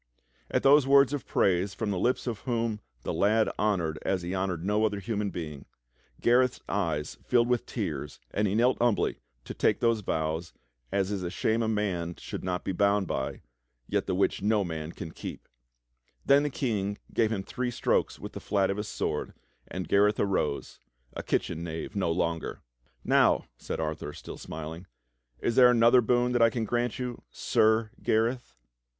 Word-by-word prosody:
At - - 0
those 140 0 +6
words 140 0 +6
of 145 - -4
praise 95 +1 +1
from 105 0 -2
the 95 - -1
lips 125 +6 +1
of 115 -4 -3
him - - -23
whom 115 -2 0 0.2
the - - -2
lad 110 +2 +3
hon 105 -1 +2
ored 80 -1 -2
as 95 -2 -1
he 90 +2 -3
honored 95 -3 -2
no 105 +2 +2
other 105 -2 +1
human 105 -1 -2
being, 75 -6 -7 0.5
Gareth's 125 +1 +3
eyes 80 -7 -2
filled 120 -1 +3
with 125 -1 0
tears - - -4
and 105 +1 +1
he 100 - 0
knelt 125 +3 +3
humbly 120 -3 +1 0.3
to - - -6
take - - +2
those 115 -2 +2
vows 80 -3 -2 0.4
"as 100 0 0
is 100 -2 -2
a 90 - -3
shame 110 +5 0
a 115 - 0
man 95 -6 -1
should - - -7
not 90 -1 -2
be - - -2
bound 100 +1 +2
by, - - -3 0.4
yet - - -1
the - - 0
which 95 - +1
no 105 0 +2
man 80 -2 -5
can 80 - -7
keep"; - - -8 0.8
then 140 +1 +6
the 150 - 0
King 105 -7 -2 0.2
gave 115 -1 +2
him 100 -3 -2
three 125 +5 -3
strokes 120 - 0
with - - -8
the - - -6
flat 100 -2 +1
of 100 - -3
his 105 0 -3
sword, - - -3 0.3
and 90 0 -5
Gareth 105 +1 +3
arose 95 -8 -1 0.2
— - - -38
a - - -4
kitchen 85 0 -1
knave 80 +2 -5
no 95 -4 +1
longer. 85 -1 -2 0.4
"Now," - - +4
said - - -4
Arthur, 75 -2 -3
still - - -9
smiling, 80 +3 -7 0.5
"is 115 - 0
there 125 -1 +8
another 120 +1 +6
boon 120 +1 +2
that 120 -1 +2
I 115 - +7
can 115 -1 -2
grant 120 +1 -1
you, 125 -2 -4
SIR 110 0 +2
Gareth.?" 115 +3 0
105 Hz, 190 wpm, -28 LUFS, 90-115 Hz, 0.8 s, there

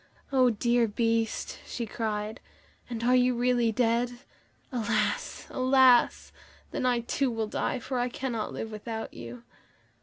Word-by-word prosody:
"Oh, 260 -2 +5
dear 235 +1 +2
Beast," 225 +1 -1
she 235 - -4
cried, 215 0 -3 0.5
"and 230 -2 -4
are 250 +1 +4
you 250 0 +3
really 240 -1 +2
dead? 235 +1 +1 0.6
Alas! 215 -4 -1
alas! 260 -1 +4 0.4
then 255 - -1
I, 245 -1 +2
too, 260 +3 0
will 225 -2 -1
die, 215 - -2
for 255 +1 -3
I 245 +1 0
cannot 240 -3 -3
live 225 - -5
without 220 +1 -5
you." 120 0 -9
235 Hz, 140 wpm, -28 LUFS, 220-250 Hz, 0.6 s, Oh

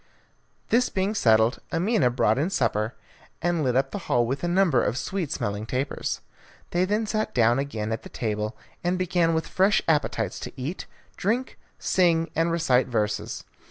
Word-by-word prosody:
This 245 +2 +3
being 195 +2 0
settled, 110 - +3
Amina 175 - +2
brought 120 -1 +2
in 160 +6 +1
supper, 115 - 0 0.4
and 170 -2 0
lit 125 -2 +1
up 135 +1 +1
the 205 - -4
hall 120 -4 +3
with 135 +7 -3
a - - +1
number 175 -7 +3
of 115 - -1
sweet 185 -3 -3
smelling 105 +2 -3
tapers. 130 +4 -2 0.5
They 175 +1 +2
then 210 +3 0
sat 215 0 -2
down 120 +1 +4
again 110 -6 -3
at 110 - -2
the - - -11
table, 105 0 -3 0.3
and 175 +1 +1
began 175 -2 +1
with 160 - 0
fresh 195 +3 +3
appetites 115 - 0
to - - -8
eat, 145 +9 -4 0.3
drink, 235 +7 -1 0.2
sing, 170 -3 +2
and 165 +1 +2
recite 135 -7 +2
verses. 105 -3 -2
150 Hz, 170 wpm, -25 LUFS, 120-180 Hz, 0.5 s, down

